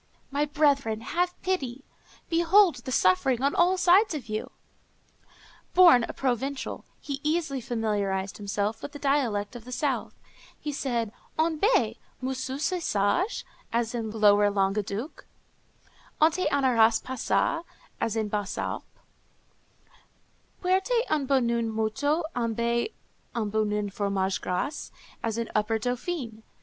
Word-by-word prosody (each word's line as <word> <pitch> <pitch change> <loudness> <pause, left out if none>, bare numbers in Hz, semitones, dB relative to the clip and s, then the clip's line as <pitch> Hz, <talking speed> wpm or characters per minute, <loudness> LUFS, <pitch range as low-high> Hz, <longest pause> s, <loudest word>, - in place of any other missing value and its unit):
My 285 +2 +1
brethren, 280 -7 +1
have 355 +8 -1
pity! 275 -8 -2 0.4
behold 345 +1 +4
the 245 +2 -7
suffering 235 +5 +3
on 280 - +2
all 360 +2 +3
sides 370 +1 +4
of 250 -7 -7
you!" 215 0 -3 1.3
Born 340 -10 +7
a - - -6
Provençal, 270 +1 -2
he 280 -1 -5
easily 305 -3 0
familiarized 205 -5 -1
himself 205 +1 -2
with 285 - -7
the - - -6
dialect 255 -7 0
of 240 - -8
the 250 - -10
south. 275 +2 -1 0.4
He 300 - -4
said, 240 -6 -2 0.3
"En 315 -1 +1
bé! 430 +8 +3 0.2
moussu, 260 0 -3
sés 350 +5 -1
sagé?" 265 - 0 0.3
as 230 0 0
in 230 -2 -3
lower 205 -1 +4
Languedoc; 200 +5 -2 0.9
"Onté 325 +4 +3
anaras 235 -5 +4
passa?" 260 +6 0 0.4
as 225 - -1
in 220 -1 0
the - - -6
Basses 205 -2 -2
Alpes; - - -3 1.8
"Puerte 385 +6 +2
un 295 -3 +1
bouen 235 -4 +2
moutu 265 +9 0
embe 235 - 0 0.4
un 215 -3 -1
bouen 210 -1 0
fromage 195 -1 -1
grase," 280 +11 -3 0.3
as 225 -1 -2
in 230 -1 -2
upper 215 +1 +1
Dauphiné. 245 0 -3
245 Hz, 130 wpm, -27 LUFS, 215-300 Hz, 1.8 s, Born